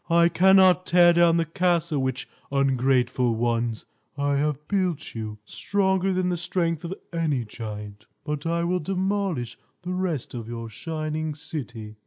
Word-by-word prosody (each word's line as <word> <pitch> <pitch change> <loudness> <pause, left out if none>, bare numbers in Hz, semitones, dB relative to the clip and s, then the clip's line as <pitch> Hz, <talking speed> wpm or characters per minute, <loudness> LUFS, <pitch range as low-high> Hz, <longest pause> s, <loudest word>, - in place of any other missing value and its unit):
I 170 0 +5
cannot 185 0 +5
tear 175 0 +6
down 170 -1 +4
the 165 - +1
castle 170 -2 +1
which, 130 0 -2 0.2
ungrateful 130 -3 +2
ones, 115 -1 -1 0.3
I 140 0 +1
have 150 0 -1
built 185 -6 -1
you, 110 -2 -5
stronger 190 - +1
than 185 -1 0
the 175 - -1
strength 170 -2 -1
of 170 +2 -4 0.2
any 150 -8 0
giant. 105 -1 -8 0.2
But 150 +1 -3
I 170 0 0
will 180 +1 +1
demolish 190 - -2 0.2
the 180 +1 -3
rest 180 -7 -2
of 115 -3 -6
your 115 -1 -6
shining 155 +4 -4
city!" 120 -9 -7
155 Hz, 150 wpm, -25 LUFS, 125-175 Hz, 0.3 s, tear